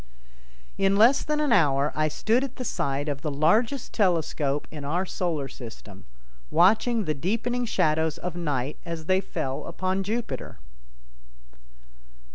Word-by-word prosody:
In 195 0 +3
less 230 +7 +5
than 300 0 -1
an 300 -4 +1
hour 145 -7 +3
I 155 0 +2
stood 225 - +1
at 270 -2 -5
the 255 - -5
side 140 -6 -1
of 140 -2 -3
the 150 - -2
largest 215 - +1
telescope 160 -7 0
in 150 -2 -7
our 170 +7 -1
Solar 165 -7 -2
System, 110 -6 -11 0.4
watching 215 - +3
the 155 - 0
deepening 230 - -1
shadows 160 -7 +1
of 180 -1 -5
night 145 -5 -2
as 165 -2 -6
they 185 +2 +2
fell 135 -7 -4
upon 185 +3 -1
Jupiter. 210 - -4
170 Hz, 140 wpm, -26 LUFS, 145-220 Hz, 0.4 s, less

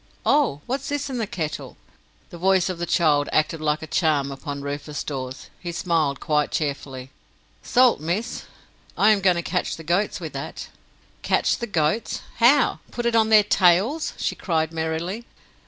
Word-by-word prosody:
Oh! 275 - +2
what's 270 +2 -3
this 285 -1 -2
in 250 - -3
the 220 - -1
kettle?" 155 -6 -5 0.5
The 175 - -9
voice 190 0 +3
of 180 -2 -4
the 175 - -2
child 155 -5 +2
acted 155 +1 +1
like 150 0 0
a - - -4
charm 150 -4 +1
upon 140 0 -6
Rufus 145 +1 -4
Dawes. 130 -2 -6
He 175 - -5
smiled 165 -5 0
quite 150 -2 +1
cheerfully. 135 -3 -4 0.5
"Salt, 250 - +4
miss. 175 +9 -3 0.5
I 210 +2 +5
am 205 -2 +2
going 185 -2 +4
to 170 - -2
catch 180 - -1
the 165 - -9
goats 175 +6 0
with - - -7
that." - - -6 0.5
"Catch - - +1
the 235 - -3
goats! 170 +2 0 0.2
How? 250 +5 +4
Put 240 - -4
it 235 -1 +2
on 220 -1 +4
their 215 -1 +7
tails?" 200 - +3
she - - -1
cried 160 -3 -1
merrily. 165 +8 -3
170 Hz, 170 wpm, -23 LUFS, 150-215 Hz, 0.5 s, their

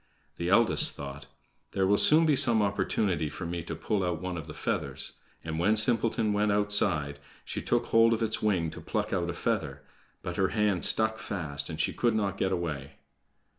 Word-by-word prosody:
The 85 +1 -2
eldest 115 +4 +3
thought: 70 0 -8 0.5
"There 95 - +1
will 100 +2 +3
soon 160 +2 +6
be 150 -2 +3
some 115 -4 +4
opportunity 95 -5 -1
for 85 +4 -7
me 85 0 -4
to 85 0 -6
pull 100 +4 -2
out 90 -3 -2
one 90 0 -4
of 80 -2 -7
the 75 - -8
feathers," - - -2 0.3
and 80 0 -4
when 105 +6 +3
Simpleton 110 -1 +2
went 105 0 +1
outside, 100 -9 +1 0.3
she - - -4
took - - 0
hold 115 0 +5
of 115 0 0
its 110 - -1
wing 90 -7 0
to - - -10
pluck - - -3
out - - -1
a - - -2
feather; - - -3 0.4
but 90 0 -5
her 95 -2 +2
hand 105 -6 +2
stuck 110 0 +2
fast, 70 -7 -4
and 80 -1 -6
she - - 0
could 120 -2 0
not 100 -2 -1
get 95 - 0
away. 75 -6 -4
95 Hz, 200 wpm, -28 LUFS, 80-110 Hz, 0.5 s, soon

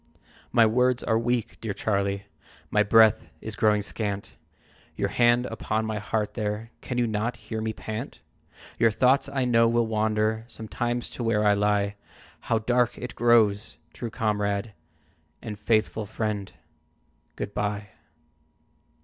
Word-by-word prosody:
"My 115 - +6
words 125 +2 +2
are 110 - +2
weak, 120 -1 -2
dear 105 -4 -3
Charlie, 100 -1 -1 0.5
My 105 - +4
breath 105 -4 +5
is 110 +3 -7
growing 105 -1 +3
scant; 100 -1 -4 0.6
Your - - -1
hand 120 +1 +3
upon 110 -1 -2
my 110 -1 -2
heart 105 0 -2
there, 110 +1 -3
Can 125 - -4
you 120 - +3
not 110 +2 -1
hear 110 -2 -6
me 110 0 -1
pant? 110 +3 -6 0.6
Your 115 - +5
thoughts 130 +5 +3
I 135 -2 0
know 115 -1 +4
will 120 0 +2
wander 110 0 0
Sometimes 120 +1 -3
to 120 - -5
where 110 -2 +2
I 105 - +6
lie 100 0 +1 0.4
How 115 - 0
dark 120 +2 +1
it 125 - -6
grows! 115 -3 +3 0.2
True 120 - -5
comrade 105 -1 -1 0.7
And 105 -4 -7
faithful 110 0 +1
friend, 105 -2 -3 0.8
good 100 - -5
by!" 105 0 -2
110 Hz, 140 wpm, -26 LUFS, 105-120 Hz, 0.8 s, My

